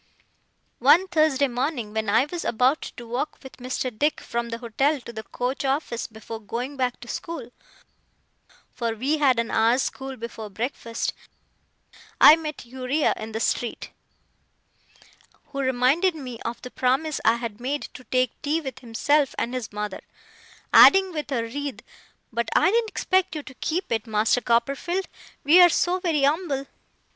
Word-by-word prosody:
One 375 Hz, +2 st, +5 dB
Thursday 310 Hz, -4 st, +3 dB
morning, 245 Hz, -3 st, -3 dB
when 220 Hz, -1 st, -1 dB
I 225 Hz, +6 st, +4 dB
was 340 Hz, +3 st, -5 dB
about 255 Hz, +6 st, +2 dB, 0.2 s
to 240 Hz, -, -8 dB
walk 250 Hz, +6 st, -3 dB
with 265 Hz, -, -12 dB
Mr. 255 Hz, -1 st, -3 dB
Dick 295 Hz, +6 st, +1 dB
from 235 Hz, 0 st, -4 dB
the 230 Hz, -, -4 dB
hotel 270 Hz, +6 st, 0 dB
to 235 Hz, -, -10 dB
the 220 Hz, -, -5 dB
coach 245 Hz, +6 st, -3 dB
office 270 Hz, -3 st, -1 dB
before 220 Hz, 0 st, -9 dB
going 245 Hz, +6 st, -4 dB
back 255 Hz, -2 st, -1 dB
to 240 Hz, -, -10 dB
school 265 Hz, -3 st, -6 dB, 1.2 s
(for 235 Hz, -2 st, -2 dB
we 280 Hz, +7 st, 0 dB
had 265 Hz, -4 st, +4 dB
an 230 Hz, 0 st, -1 dB
hour's 230 Hz, +4 st, +3 dB
school 265 Hz, -1 st, -5 dB
before 225 Hz, -2 st, -7 dB
breakfast), 230 Hz, +1 st, -3 dB, 1.1 s
I 305 Hz, -, +10 dB
met 305 Hz, -5 st, -6 dB
Uriah 260 Hz, +4 st, 0 dB
in 220 Hz, +1 st, -7 dB
the 220 Hz, -, -3 dB
street, 235 Hz, +1 st, -2 dB, 1.6 s
who 275 Hz, -1 st, -6 dB
reminded 270 Hz, +7 st, +2 dB
me 255 Hz, -6 st, -7 dB
of 235 Hz, +1 st, -5 dB
the 250 Hz, -, -8 dB
promise 270 Hz, +4 st, 0 dB
I 225 Hz, +1 st, +4 dB
had 235 Hz, -2 st, -6 dB
made 280 Hz, +4 st, -2 dB
to 255 Hz, -, -11 dB
take 255 Hz, +1 st, +1 dB
tea 300 Hz, +3 st, 0 dB
with 265 Hz, -5 st, -7 dB
himself 270 Hz, +4 st, +1 dB
and 240 Hz, -, -2 dB
his 250 Hz, -4 st, -4 dB
mother: 210 Hz, -1 st, -5 dB, 0.7 s
adding, 385 Hz, -1 st, +8 dB
with 300 Hz, -2 st, -5 dB
a 240 Hz, -4 st, 0 dB
writhe, 280 Hz, +4 st, -5 dB, 0.5 s
'But 235 Hz, 0 st, -1 dB
I -, -, +5 dB
didn't 455 Hz, 0 st, +1 dB
expect 375 Hz, -5 st, 0 dB
you 300 Hz, -, -4 dB
to 260 Hz, -, -11 dB
keep 330 Hz, +6 st, -3 dB
it, 225 Hz, 0 st, -1 dB
Master 220 Hz, +3 st, +2 dB
Copperfield, 275 Hz, -, 0 dB, 0.4 s
we're 350 Hz, +5 st, +8 dB
so 355 Hz, +2 st, +1 dB
very 320 Hz, -6 st, +1 dB
umble. 285 Hz, -2 st, 0 dB
255 Hz, 160 wpm, -24 LUFS, 235-300 Hz, 1.6 s, I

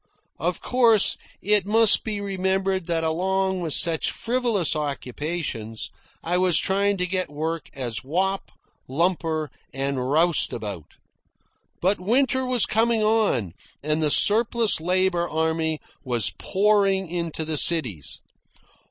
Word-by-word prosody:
Of -, -, -2 dB
course, 235 Hz, -5 st, +4 dB, 0.3 s
it 205 Hz, -2 st, +3 dB
must 225 Hz, 0 st, +6 dB
be 215 Hz, -2 st, -3 dB
remembered 190 Hz, -2 st, -1 dB
that 165 Hz, -1 st, -1 dB
along 190 Hz, +3 st, 0 dB
with 160 Hz, -4 st, 0 dB
such 165 Hz, -2 st, +1 dB
frivolous 230 Hz, -9 st, 0 dB
occupations 140 Hz, -5 st, -4 dB, 0.3 s
I 175 Hz, +2 st, 0 dB
was 180 Hz, -3 st, +3 dB
trying 200 Hz, +1 st, +1 dB
to 180 Hz, -, 0 dB
get 185 Hz, 0 st, -2 dB
work 160 Hz, +2 st, -4 dB
as 120 Hz, -6 st, -4 dB
wop, 190 Hz, +7 st, -1 dB, 0.4 s
lumper, 160 Hz, 0 st, -1 dB, 0.2 s
and 135 Hz, 0 st, -2 dB
roustabout. 125 Hz, -, 0 dB, 0.9 s
But 190 Hz, +3 st, +2 dB
winter 260 Hz, +6 st, +1 dB
was 250 Hz, -4 st, +3 dB
coming 225 Hz, 0 st, +1 dB
on, 210 Hz, -, +1 dB, 0.3 s
and 155 Hz, +1 st, 0 dB
the 155 Hz, -, +2 dB
surplus 225 Hz, +2 st, +2 dB
labour 180 Hz, 0 st, +1 dB
army 160 Hz, 0 st, -1 dB, 0.2 s
was 120 Hz, -6 st, -1 dB
pouring 195 Hz, -1 st, +2 dB
into 170 Hz, -2 st, -3 dB
the 155 Hz, -1 st, -2 dB
cities. 120 Hz, -, -1 dB
175 Hz, 120 wpm, -24 LUFS, 155-200 Hz, 0.9 s, must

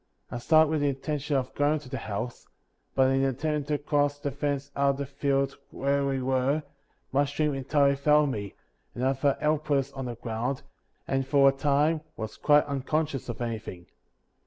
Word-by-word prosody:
I 120 Hz, -, -4 dB
started 155 Hz, +4 st, +4 dB
with 155 Hz, -2 st, +1 dB
the 145 Hz, -, +2 dB
intention 145 Hz, +1 st, -2 dB
of 130 Hz, -1 st, -1 dB
going 145 Hz, +2 st, +2 dB
to 145 Hz, -, -13 dB
the 130 Hz, +1 st, -4 dB
house; 110 Hz, +4 st, -5 dB, 0.5 s
but, 130 Hz, -1 st, +4 dB
in 135 Hz, 0 st, +2 dB
attempting 145 Hz, +3 st, -1 dB
to 150 Hz, 0 st, 0 dB
cross 145 Hz, -1 st, +1 dB
the 145 Hz, -1 st, -3 dB
fence 140 Hz, +1 st, -2 dB
out 140 Hz, 0 st, +3 dB
of 135 Hz, -, 0 dB
the 140 Hz, -, -3 dB
field 140 Hz, 0 st, 0 dB
where 140 Hz, +1 st, 0 dB
we 135 Hz, -1 st, -1 dB
were, 135 Hz, +3 st, +1 dB, 0.5 s
my 140 Hz, +2 st, +3 dB
strength 150 Hz, +1 st, 0 dB
entirely 140 Hz, +1 st, +2 dB
failed 150 Hz, +1 st, +3 dB
me, 100 Hz, -4 st, -5 dB, 0.4 s
and 125 Hz, -, -1 dB
I 135 Hz, -, +3 dB
fell 135 Hz, +1 st, +1 dB
helpless 145 Hz, -3 st, 0 dB
on 135 Hz, -1 st, -5 dB
the 120 Hz, -1 st, -4 dB
ground, 120 Hz, +4 st, -3 dB, 0.4 s
and 135 Hz, -1 st, 0 dB
for 140 Hz, -1 st, +6 dB
a -, -, +3 dB
time 145 Hz, +3 st, +1 dB, 0.2 s
was 110 Hz, -1 st, -6 dB
quite 150 Hz, -1 st, +4 dB
unconscious 140 Hz, 0 st, -2 dB
of 120 Hz, +1 st, -4 dB
anything. 110 Hz, -6 st, -5 dB
140 Hz, 185 wpm, -27 LUFS, 130-145 Hz, 0.5 s, for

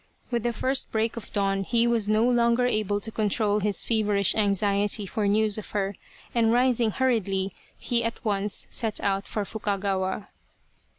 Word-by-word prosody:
With 235 Hz, -1 st, 0 dB
the 240 Hz, +1 st, 0 dB
first 260 Hz, +3 st, -1 dB
break 225 Hz, +1 st, 0 dB
of 230 Hz, -, -8 dB
dawn 195 Hz, -1 st, 0 dB
he 235 Hz, +3 st, +2 dB
was 230 Hz, -3 st, +1 dB
no 215 Hz, +2 st, +3 dB
longer 240 Hz, 0 st, +3 dB
able 215 Hz, -4 st, 0 dB
to 220 Hz, +2 st, -4 dB
control 210 Hz, -1 st, +1 dB
his 205 Hz, -1 st, 0 dB
feverish 210 Hz, -4 st, +2 dB
anxiety 205 Hz, 0 st, +2 dB
for 205 Hz, +2 st, -2 dB
news 215 Hz, +1 st, +2 dB
of 215 Hz, -, -9 dB
her, 195 Hz, 0 st, -1 dB, 0.4 s
and 230 Hz, -2 st, +3 dB
rising 245 Hz, -1 st, +3 dB
hurriedly, 200 Hz, -6 st, 0 dB, 0.2 s
he 235 Hz, -1 st, 0 dB
at 230 Hz, +1 st, -4 dB
once 205 Hz, -1 st, 0 dB
set 225 Hz, -3 st, -1 dB
out 195 Hz, 0 st, -1 dB
for 210 Hz, -2 st, -2 dB
Fukagawa. 195 Hz, -2 st, -2 dB
215 Hz, 165 wpm, -26 LUFS, 200-230 Hz, 0.4 s, no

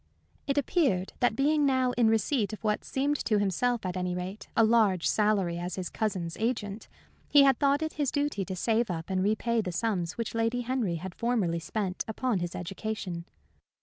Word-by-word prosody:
It 280 Hz, 0 st, 0 dB
appeared 270 Hz, -, +1 dB
that 245 Hz, -3 st, +2 dB
being 295 Hz, +4 st, +2 dB
now 260 Hz, -2 st, +2 dB
in 240 Hz, -2 st, +2 dB
receipt 220 Hz, 0 st, +1 dB
of 215 Hz, -, -8 dB
what 210 Hz, -1 st, 0 dB
seemed 285 Hz, +2 st, -1 dB
to 215 Hz, -, +2 dB
himself, 205 Hz, +4 st, 0 dB
at 180 Hz, 0 st, -2 dB
any 180 Hz, -1 st, -2 dB
rate, 185 Hz, +3 st, -6 dB
a 225 Hz, -, +6 dB
large 215 Hz, -6 st, +3 dB
salary 200 Hz, -5 st, +1 dB
as 175 Hz, 0 st, -4 dB
his 185 Hz, -2 st, -4 dB
cousin's 185 Hz, -7 st, -2 dB
agent, 220 Hz, -2 st, -2 dB, 0.4 s
he 290 Hz, -1 st, +7 dB
had 270 Hz, -1 st, +4 dB
thought 285 Hz, +1 st, +3 dB
it 315 Hz, -, -3 dB
his 290 Hz, -3 st, 0 dB
duty 285 Hz, -8 st, -1 dB
to 190 Hz, -, -4 dB
save 225 Hz, +4 st, +1 dB
up 165 Hz, +1 st, -4 dB
and 185 Hz, 0 st, +1 dB
repay 220 Hz, +3 st, +1 dB
the 185 Hz, -4 st, -4 dB
sums 180 Hz, -3 st, -1 dB
which 230 Hz, -1 st, -4 dB
Lady 230 Hz, +2 st, 0 dB
Henry 240 Hz, -7 st, -1 dB
had 180 Hz, +2 st, -6 dB
formerly 210 Hz, -8 st, 0 dB
spent 185 Hz, +2 st, -3 dB
upon 225 Hz, -1 st, -1 dB
his 175 Hz, 0 st, -4 dB
education. 185 Hz, -1 st, -4 dB
215 Hz, 190 wpm, -29 LUFS, 185-245 Hz, 0.4 s, he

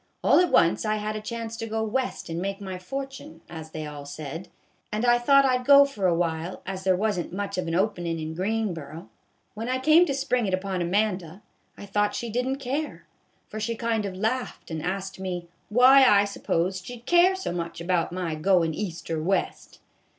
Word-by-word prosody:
All -, -, +5 dB
at 360 Hz, -2 st, +2 dB
once 165 Hz, -, +4 dB
I 215 Hz, -1 st, 0 dB
had 215 Hz, 0 st, -3 dB
a 215 Hz, -, -4 dB
chance 230 Hz, +1 st, -5 dB
to 225 Hz, -, -4 dB
go 220 Hz, 0 st, -2 dB
West 250 Hz, +4 st, -2 dB
and 165 Hz, +1 st, -4 dB
make 195 Hz, +1 st, -3 dB
my 190 Hz, -2 st, -6 dB
fortune, 270 Hz, -5 st, -7 dB
as 160 Hz, -2 st, -8 dB
they 155 Hz, -1 st, -6 dB
all 145 Hz, -1 st, -7 dB
said, 155 Hz, +4 st, -7 dB, 0.4 s
and 215 Hz, +3 st, -1 dB
I 240 Hz, 0 st, +5 dB
thought 275 Hz, +3 st, +5 dB
I 255 Hz, -1 st, +3 dB
'd 250 Hz, -, -10 dB
go 280 Hz, 0 st, +9 dB
for 210 Hz, -9 st, -1 dB
a 175 Hz, -, +3 dB
while, 165 Hz, +1 st, -2 dB
as 190 Hz, 0 st, -5 dB
there 190 Hz, -1 st, +3 dB
was 205 Hz, 0 st, 0 dB
n't 175 Hz, -, -5 dB
much 200 Hz, +2 st, -4 dB
of 175 Hz, -, -3 dB
an 165 Hz, -, -1 dB
openin' 175 Hz, -4 st, 0 dB
in 160 Hz, 0 st, -5 dB
Greenboro. 175 Hz, -5 st, -3 dB, 0.4 s
When 225 Hz, +3 st, -5 dB
I 255 Hz, -, +1 dB
came 310 Hz, +6 st, +5 dB
to 275 Hz, -, -1 dB
spring 250 Hz, -4 st, 0 dB
it 185 Hz, -, +2 dB
upon 185 Hz, -1 st, -3 dB
Amanda, 185 Hz, 0 st, -1 dB, 0.3 s
I -, -, -9 dB
thought 205 Hz, +1 st, 0 dB
she 235 Hz, -1 st, -4 dB
did 250 Hz, +3 st, -1 dB
n't 270 Hz, +1 st, -2 dB
care, 280 Hz, +4 st, -4 dB, 0.4 s
for 215 Hz, -, -7 dB
she 230 Hz, +2 st, -2 dB
kind 225 Hz, -1 st, -1 dB
o' 200 Hz, -, -2 dB
laughed 220 Hz, +3 st, -3 dB
and 160 Hz, -1 st, -3 dB
asked 190 Hz, +3 st, -4 dB
me 180 Hz, -2 st, -4 dB
' -, -, -41 dB
why 265 Hz, +2 st, +8 dB
I 205 Hz, -5 st, +6 dB
s'posed 185 Hz, -2 st, -2 dB
she 245 Hz, -, -7 dB
'd 235 Hz, -, -20 dB
care 350 Hz, +2 st, +5 dB
so 380 Hz, -, -4 dB
much 170 Hz, -1 st, -4 dB
about 170 Hz, -1 st, 0 dB
my 175 Hz, -2 st, -3 dB
goin' 165 Hz, 0 st, +2 dB
East 175 Hz, -1 st, -5 dB
or 160 Hz, -1 st, -1 dB
West.' 190 Hz, +5 st, -2 dB
200 Hz, 220 wpm, -26 LUFS, 175-235 Hz, 0.4 s, go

